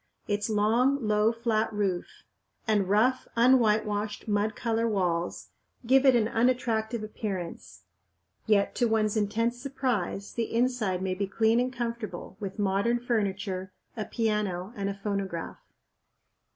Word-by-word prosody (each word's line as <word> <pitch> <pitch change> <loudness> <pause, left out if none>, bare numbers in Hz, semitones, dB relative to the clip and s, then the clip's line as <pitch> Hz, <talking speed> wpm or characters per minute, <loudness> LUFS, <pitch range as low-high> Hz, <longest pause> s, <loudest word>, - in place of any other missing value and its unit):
Its 205 +1 -1
long, 230 +5 +2
low, 210 +1 +3
flat 230 -2 0
roof 200 -4 -2 0.4
and 205 -4 +2
rough, 245 +6 +2
unwhitewashed, 215 -4 +2
mud 210 +2 0
colored 230 -2 0
walls 180 -4 -1 0.4
give 265 +3 +5
it 260 - +7
an 220 -3 +3
unattractive 230 -2 0
appearance; 180 - -6 0.6
yet 205 -2 +3
to 240 - +1
one's 220 -1 +1
intense 230 +3 0
surprise 250 -8 -2
the 230 -1 -2
inside 230 -7 +1
may 190 -1 0
be 195 +1 -2
clean 220 +4 +2
and 250 +1 0
comfortable, 235 -2 -5
with 195 -1 -5
modern 205 +4 +1
furniture, 195 -5 -2 0.2
a 220 - -2
piano, 210 -4 -1
and 200 -1 -2
a 200 - -4
phonograph. 195 -4 -4
215 Hz, 130 wpm, -28 LUFS, 200-235 Hz, 0.6 s, it